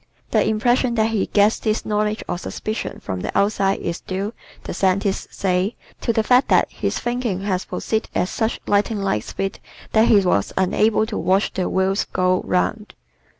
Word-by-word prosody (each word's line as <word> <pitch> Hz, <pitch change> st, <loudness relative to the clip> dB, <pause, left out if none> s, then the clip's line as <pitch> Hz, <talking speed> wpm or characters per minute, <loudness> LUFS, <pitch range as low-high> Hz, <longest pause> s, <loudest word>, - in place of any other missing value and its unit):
The -, -, +3 dB
impression 240 Hz, +3 st, +1 dB
that 220 Hz, 0 st, +2 dB
he 215 Hz, -3 st, 0 dB
gets 205 Hz, +1 st, +3 dB
this 215 Hz, -1 st, -1 dB
knowledge 210 Hz, 0 st, 0 dB
or 175 Hz, -, -3 dB
suspicion 215 Hz, +4 st, -4 dB
from 95 Hz, -2 st, -4 dB
the -, -, -3 dB
outside 200 Hz, -1 st, +1 dB
is 170 Hz, +1 st, -3 dB
due, 195 Hz, +4 st, -3 dB, 0.3 s
the -, -, -5 dB
scientists 195 Hz, +1 st, 0 dB
say, 190 Hz, +3 st, 0 dB, 0.3 s
to 235 Hz, -, +1 dB
the 220 Hz, -1 st, +1 dB
fact 250 Hz, +4 st, +4 dB
that -, -, +3 dB
his -, -, -2 dB
thinking 240 Hz, -6 st, -2 dB
has 190 Hz, -2 st, -1 dB
proceeded 220 Hz, 0 st, -2 dB
at 180 Hz, -, +1 dB
such 225 Hz, 0 st, -1 dB
lightning 205 Hz, 0 st, +1 dB
like 150 Hz, -, 0 dB
speed 195 Hz, -, -4 dB, 0.3 s
that 220 Hz, +1 st, +4 dB
he 215 Hz, -, +6 dB
was 100 Hz, -, +1 dB
unable 215 Hz, +4 st, +2 dB
to 220 Hz, -1 st, -4 dB
watch 190 Hz, +2 st, +1 dB
the 185 Hz, -, -1 dB
wheels 190 Hz, +1 st, +1 dB
go 185 Hz, 0 st, +1 dB
round. 210 Hz, +3 st, -1 dB
205 Hz, 180 wpm, -21 LUFS, 190-220 Hz, 0.3 s, he